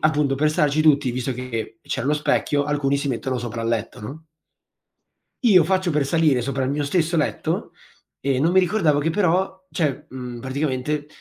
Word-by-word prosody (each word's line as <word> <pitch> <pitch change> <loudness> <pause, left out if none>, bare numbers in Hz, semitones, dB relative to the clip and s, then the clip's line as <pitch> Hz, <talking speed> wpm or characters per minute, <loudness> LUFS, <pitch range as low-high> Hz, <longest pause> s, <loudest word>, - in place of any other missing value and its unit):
appunto 150 -3 +2
per 150 +2 +2
starci 150 0 +2
tutti, 145 -4 +4
visto 130 +2 -2
che 115 -3 -5
c'era 125 - -3
lo 150 - +3
specchio, 145 -1 +1
alcuni 145 -1 0
si 140 0 -2
mettono 130 0 -2
sopra 120 -1 -5
al 115 - -1
letto, 115 -1 -2
no 150 +10 -9 1.2
io 190 -8 +6
faccio 185 +1 +1
per 150 -3 +1
salire 155 -4 +3
sopra 135 +2 -2
il 130 - -1
mio 145 +1 -1
stesso 170 +2 +1
letto 150 - -1 0.5
e 135 -2 0
non 165 +4 +2
mi 190 - +6
ricordavo 175 -6 +2
che 160 +3 0
però, 185 +1 0
cioè, 150 -2 -1
mhmm, 125 -2 -7
praticamente 140 +2 -2
145 Hz, 180 wpm, -22 LUFS, 130-160 Hz, 1.2 s, io